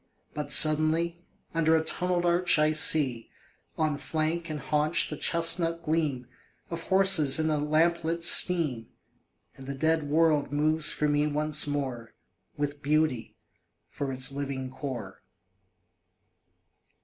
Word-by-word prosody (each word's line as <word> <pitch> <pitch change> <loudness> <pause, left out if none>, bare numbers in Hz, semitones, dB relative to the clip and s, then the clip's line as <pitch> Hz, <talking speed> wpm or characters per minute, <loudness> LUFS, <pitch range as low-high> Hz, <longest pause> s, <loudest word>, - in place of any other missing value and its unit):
But 145 -1 -5
suddenly, 160 +3 +4 0.3
Under 160 -1 +1
a 160 - 0
tunnelled 175 +1 -1
arch 175 0 +2
I 155 0 +2
see 140 -6 +3 0.5
On 155 -2 -2
flank 160 +2 -3
and 155 -1 -5
haunch 150 +3 0
the - - -4
chestnut 170 0 0
gleam 155 -6 -2 0.5
Of 165 0 -7
horses 190 -7 +3
in 160 0 -1
a 150 - -1
lamplit 165 +2 -1
steam; 160 -10 +2 0.7
And 135 - -13
the 140 - -5
dead 160 +1 -1
world 155 -2 +1
moves 155 +1 +1
for 150 - -2
me 145 0 0
once 150 0 +1
more 130 -5 -5 0.4
With 145 0 -4
beauty 150 -5 -2 0.5
for 140 -1 -5
its 130 0 0
living 135 -2 -6
core. 130 -3 -8
155 Hz, 125 wpm, -26 LUFS, 145-165 Hz, 0.7 s, suddenly